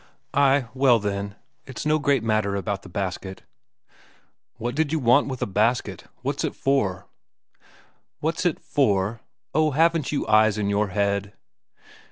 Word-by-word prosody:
"Ay 140 -1 +3
well, 130 -2 +4
then. 100 -1 -3 0.3
It's 130 +2 -6
no 155 0 +2
great 140 -4 +1
matter 110 -3 0
about 100 0 -3
the 95 - -13
basket." 95 0 -5 1.1
"What 120 +2 -4
did 155 +1 0
you 160 - +1
want 125 0 +4
with 130 -2 -3
a - - +1
basket? 110 +5 0 0.2
What's - - -2
it - - -2
for?" 100 -9 0 1.1
"What's 160 +3 -1
it 175 -4 0
for?... 105 -5 0 0.3
Oh, 155 +1 +3
haven't 165 0 +2
you 145 - -1
eyes 110 0 +4
in 100 -1 0
your 105 +1 +1
head!" 100 +1 -1
115 Hz, 150 wpm, -24 LUFS, 100-140 Hz, 1.1 s, well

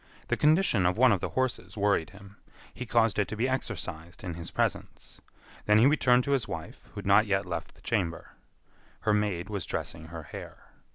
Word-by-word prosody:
The - - +2
condition 150 - +3
of 90 - 0
one 130 +1 +6
of 100 - +2
the - - -2
horses 130 -3 -2
worried 100 -6 +2
him. 100 0 -15 0.4
He 125 0 -7
caused 115 -3 +2
it 100 - +2
to - - -5
be 115 +4 0
exercised 95 -7 -5
in 90 -3 -4
his 85 0 -7
presence. - - -3 0.5
Then 105 0 +6
he 110 - +6
returned 125 -4 +4
to 140 - -2
his 135 -5 +1
wife, - - -7
who - - -25
had - - -6
not 100 +2 +5
yet 100 0 +1
left 85 -2 -5
the - - -21
chamber. 85 -1 -2 0.7
Her 105 - +2
maid 100 -4 0
was 100 -5 -4
dressing 80 -1 -4
her 80 0 -8
hair. - - -10
105 Hz, 205 wpm, -29 LUFS, 90-120 Hz, 0.7 s, one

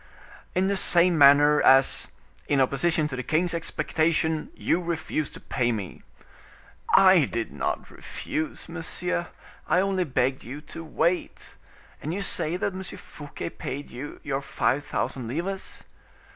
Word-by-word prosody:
"In 185 +1 +2
the 200 - +1
same 175 -1 +3
manner, 145 0 +6
as, 135 0 +5 0.4
in 145 - +2
opposition 150 +4 +2
to 135 - -5
the 130 - -3
king's 165 +6 +1
expectation, 160 +1 0
you 180 - 0
refused 160 -3 -3
to - - -9
pay 120 -2 -1
me." 100 -5 -5 0.9
"I 185 -5 +7
did 115 -2 -3
not - - -3
refuse, 155 0 -5
monsieur, 175 +1 -3 0.4
I - - +3
only 190 -1 +1
begged 130 -2 0
you 135 +5 -7
to 160 +2 -9
wait. 170 +2 -2 0.5
And 160 +4 -3
you 200 - -2
say 170 -2 -2
that 190 - -1
M. 190 - -5
Fouquet 150 -4 -8
paid 140 +3 -6
you 130 +5 -7
your 140 -1 -2
five 140 0 0
thousand 125 -4 -3
livres?" 180 +10 -4
155 Hz, 145 wpm, -26 LUFS, 140-175 Hz, 0.9 s, I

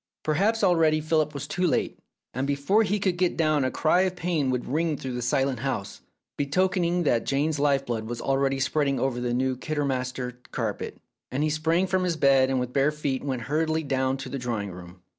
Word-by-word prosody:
Perhaps 200 +9 +1
already 165 -4 +4
Philip 155 -1 +1
was 140 - -4
too 180 0 0
late, - - 0 0.3
and 130 +3 -2
before 140 +10 +2
he 205 -1 +1
could 185 -3 0
get 180 -1 +1
down 155 -3 +2
a 130 - +1
cry 165 +6 +2
of 185 -1 0
pain 165 -6 0
would 125 -1 -1
ring 155 +2 0
through 130 -1 -5
the 125 - -3
silent 130 +1 0
house, 125 -6 -4 0.4
betokening 175 +3 +1
that 120 -7 +2
Jane's 145 +2 0
life 140 -1 +2
blood 115 -3 -3
was 120 +1 -5
already 135 +1 +1
spreading 140 0 +1
over 130 -2 0
the 125 -1 -1
new 130 +1 0
Kidderminster 130 -3 -3
carpet, - - -3 0.3
and 135 +3 -1
he 155 - +1
sprang 165 +4 +1
from 185 0 0
his 175 -3 0
bed 135 -3 +4
and 135 -1 +1
with 125 0 -3
bare 140 +2 +3
feet 145 -3 -2
went 130 -4 -3
hurriedly 160 +4 0
down 130 -1 0
to 135 - -7
the 140 - -4
drawing 115 -5 -3
room. 90 0 -12
140 Hz, 205 wpm, -26 LUFS, 130-160 Hz, 0.4 s, already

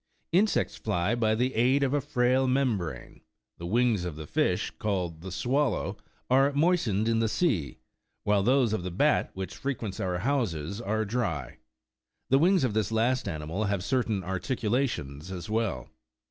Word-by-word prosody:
Insects 200 +5 +2
fly 90 +6 0
by 110 -2 +2
the 125 +3 0
aid 130 +5 +3
of 135 0 +1
a 145 - +2
frail 130 -1 +2
membrane; 125 -10 -1 0.4
the 85 - -5
wings 115 -1 +2
of 90 -4 -4
the 80 0 -7
fish19 - - 0
called 90 -6 -2
the 95 +1 -7
"swallow" 130 +6 0 0.3
are 135 +2 +4
moistened 140 - +2
in 115 -1 +2
the 115 -1 +1
sea, 110 - 0 0.5
while 105 -1 +3
those 125 +1 +3
of 110 - -1
the 90 - -4
bat 90 - +2
which 95 -1 -5
frequents 115 -8 -4
our 90 -3 -1
houses 100 - -1
are 110 0 -1
dry; 100 - -3 0.7
the 135 - +6
wings 180 +2 +4
of 125 -5 +1
this 110 -1 0
last 120 +2 +1
animal 80 +4 -3
have 100 -2 -1
certain 115 -6 0
articulations 95 - -2
as 90 +2 -6
well. 100 - -1
110 Hz, 160 wpm, -28 LUFS, 95-130 Hz, 0.7 s, the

